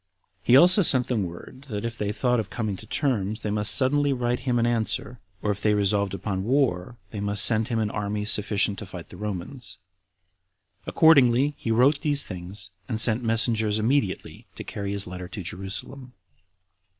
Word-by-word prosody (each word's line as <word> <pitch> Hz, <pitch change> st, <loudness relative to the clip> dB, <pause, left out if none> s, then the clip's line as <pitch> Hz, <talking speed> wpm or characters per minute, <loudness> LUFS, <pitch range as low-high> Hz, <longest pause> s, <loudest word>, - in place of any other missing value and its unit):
He 125 Hz, -, +5 dB
also 180 Hz, +7 st, +7 dB
sent 130 Hz, -8 st, +4 dB
them 110 Hz, -6 st, -1 dB
word, 130 Hz, +11 st, -11 dB
that 105 Hz, -1 st, -4 dB
if 115 Hz, 0 st, -5 dB
they 105 Hz, -2 st, -3 dB
thought 125 Hz, +2 st, 0 dB
of 105 Hz, -, -4 dB
coming 110 Hz, -4 st, -4 dB
to 110 Hz, -, -13 dB
terms, 110 Hz, -6 st, -2 dB
they 105 Hz, -, -2 dB
must 105 Hz, 0 st, +3 dB
suddenly 145 Hz, +2 st, +2 dB
write 125 Hz, -1 st, -2 dB
him 125 Hz, -1 st, -1 dB
an 115 Hz, -, +1 dB
answer; 120 Hz, +1 st, -2 dB, 0.2 s
or 105 Hz, -, 0 dB
if 100 Hz, -, -6 dB
they 105 Hz, -1 st, +2 dB
resolved 100 Hz, -1 st, 0 dB
upon 95 Hz, 0 st, -4 dB
war, 120 Hz, -4 st, -1 dB
they 105 Hz, -, -6 dB
must 100 Hz, -1 st, +4 dB
send 110 Hz, -1 st, +3 dB
him 120 Hz, -3 st, -2 dB
an 110 Hz, -2 st, -1 dB
army 105 Hz, 0 st, -3 dB
sufficient 105 Hz, -2 st, 0 dB
to 105 Hz, -, -8 dB
fight 90 Hz, -3 st, -10 dB
the -, -, -13 dB
Romans. 105 Hz, +5 st, -6 dB, 1.1 s
Accordingly, 140 Hz, -3 st, +4 dB
he 115 Hz, -, -6 dB
wrote 130 Hz, +6 st, +3 dB
these 145 Hz, -2 st, +3 dB
things, 95 Hz, +1 st, -5 dB, 0.2 s
and 110 Hz, -3 st, -2 dB
sent 110 Hz, +1 st, +4 dB
messengers 110 Hz, -2 st, +2 dB
immediately 110 Hz, -3 st, -2 dB
to -, -, -7 dB
carry 100 Hz, -1 st, -6 dB
his 100 Hz, 0 st, -2 dB
letter 90 Hz, 0 st, -8 dB
to 95 Hz, +1 st, -8 dB
Jerusalem. 115 Hz, +9 st, -7 dB
110 Hz, 185 wpm, -24 LUFS, 100-125 Hz, 1.1 s, also